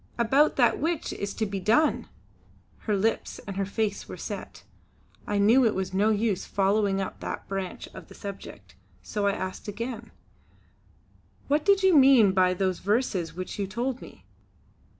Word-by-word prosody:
"About 265 Hz, +6 st, +3 dB
that 240 Hz, -3 st, +3 dB
which 325 Hz, +1 st, -2 dB
is 200 Hz, 0 st, -4 dB
to 220 Hz, -, -1 dB
be 195 Hz, -1 st, -4 dB
done!" 225 Hz, -, +2 dB, 0.8 s
Her 210 Hz, -2 st, +2 dB
lips 225 Hz, +3 st, -1 dB
and 195 Hz, -, -6 dB
her 195 Hz, 0 st, -2 dB
face 205 Hz, 0 st, -2 dB
were -, -, -7 dB
set; -, -, -7 dB, 0.6 s
I 205 Hz, -, 0 dB
knew 225 Hz, +6 st, +5 dB
it 225 Hz, -3 st, +2 dB
was 190 Hz, 0 st, -3 dB
no 205 Hz, +3 st, +2 dB
use 215 Hz, -2 st, 0 dB
following 200 Hz, 0 st, +1 dB
up 190 Hz, -, -5 dB
that -, -, -6 dB
branch 195 Hz, -2 st, -5 dB
of -, -, -11 dB
the -, -, -14 dB
subject, 200 Hz, -1 st, -9 dB, 0.3 s
so 205 Hz, -1 st, -2 dB
I 200 Hz, -, +2 dB
asked 185 Hz, +1 st, -5 dB
again: 230 Hz, +2 st, -5 dB, 1.4 s
"What 295 Hz, +2 st, +1 dB
did 395 Hz, +1 st, +3 dB
you 380 Hz, -3 st, +5 dB
mean 260 Hz, -7 st, +7 dB
by 185 Hz, -1 st, +2 dB
those 185 Hz, -1 st, -1 dB
verses 200 Hz, -5 st, -1 dB
which 185 Hz, +3 st, -6 dB
you 200 Hz, -, -1 dB
told 240 Hz, +5 st, -3 dB
me?" -, -, -13 dB
205 Hz, 170 wpm, -26 LUFS, 195-240 Hz, 1.4 s, mean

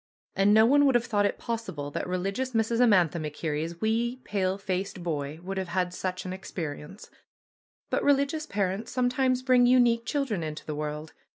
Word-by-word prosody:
And 195 Hz, +1 st, +4 dB
no 220 Hz, +1 st, +7 dB
one 285 Hz, +4 st, +5 dB
would 265 Hz, -, +3 dB
have 240 Hz, -1 st, +3 dB
thought 205 Hz, -3 st, +2 dB
it -, -, -4 dB
possible 190 Hz, -12 st, -4 dB
that -, -, -3 dB
religious 195 Hz, +8 st, -2 dB
Mrs. 230 Hz, +1 st, +1 dB
Amantha 180 Hz, -8 st, +4 dB
MacKerrie's 155 Hz, +2 st, -4 dB
wee, 230 Hz, +3 st, 0 dB
pale 190 Hz, -2 st, -1 dB
faced 190 Hz, -1 st, -3 dB
boy 150 Hz, -2 st, -3 dB
would 195 Hz, +1 st, -3 dB
have 190 Hz, -, -3 dB
had 180 Hz, +1 st, -1 dB
such 185 Hz, 0 st, -4 dB
an 185 Hz, -, -4 dB
experience. 170 Hz, -1 st, -7 dB, 0.8 s
But -, -, +1 dB
religious 285 Hz, +2 st, +2 dB
parents 200 Hz, +2 st, -2 dB
sometimes 255 Hz, 0 st, +1 dB
bring 250 Hz, -2 st, +5 dB
unique 240 Hz, -2 st, +4 dB
children 270 Hz, -, -1 dB
into 155 Hz, -1 st, -6 dB
the 155 Hz, -, -4 dB
world. 150 Hz, +1 st, -5 dB
195 Hz, 175 wpm, -27 LUFS, 170-240 Hz, 0.8 s, no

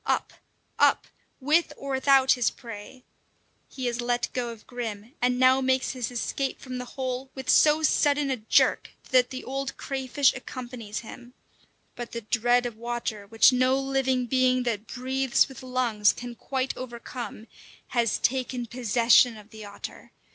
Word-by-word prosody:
Up! -, -, 0 dB, 0.5 s
Up! -, -, +4 dB, 0.3 s
With 305 Hz, +5 st, +2 dB
or 275 Hz, -, -6 dB
without 265 Hz, 0 st, +4 dB
his 245 Hz, -2 st, +3 dB
prey! 230 Hz, +2 st, -11 dB, 0.7 s
He 260 Hz, -, -6 dB
has 240 Hz, 0 st, -1 dB
let 240 Hz, 0 st, -1 dB
go 245 Hz, -2 st, -2 dB
of 230 Hz, -2 st, -10 dB
Grim, 230 Hz, -1 st, -6 dB
and 250 Hz, 0 st, +2 dB
now 260 Hz, +1 st, +5 dB
makes 260 Hz, 0 st, +1 dB
his 250 Hz, -4 st, -4 dB
escape 260 Hz, +2 st, -3 dB
from 255 Hz, -1 st, -6 dB
the 250 Hz, -, -5 dB
hole 260 Hz, 0 st, -3 dB
with 265 Hz, -1 st, -1 dB
so 305 Hz, +1 st, +5 dB
sudden 290 Hz, -2 st, +2 dB
a 260 Hz, -, -1 dB
jerk 215 Hz, -1 st, +2 dB, 0.2 s
that 255 Hz, -1 st, +4 dB
the 260 Hz, -1 st, -6 dB
old 270 Hz, +1 st, -4 dB
crayfish 270 Hz, 0 st, +1 dB
accompanies 245 Hz, -5 st, -7 dB
him; 240 Hz, +2 st, -12 dB, 0.6 s
but 240 Hz, -1 st, -7 dB
the 235 Hz, -, -4 dB
dread 240 Hz, +2 st, +2 dB
of 235 Hz, -3 st, -5 dB
water, 235 Hz, -3 st, -4 dB
which 225 Hz, +5 st, +5 dB
no 255 Hz, +1 st, +3 dB
living 270 Hz, -2 st, 0 dB
being 255 Hz, 0 st, +2 dB
that 230 Hz, -3 st, -2 dB
breathes 260 Hz, 0 st, +1 dB
with 265 Hz, -1 st, -11 dB
lungs 250 Hz, -5 st, +1 dB
can 245 Hz, 0 st, -7 dB
quite 265 Hz, +2 st, -3 dB
overcome, 240 Hz, -2 st, -7 dB, 0.4 s
has 235 Hz, -3 st, +1 dB
taken 250 Hz, -1 st, -1 dB
possession 235 Hz, 0 st, +3 dB
of 210 Hz, 0 st, -15 dB
the 220 Hz, -1 st, -10 dB
otter. 200 Hz, -1 st, -10 dB
250 Hz, 160 wpm, -26 LUFS, 235-265 Hz, 0.7 s, now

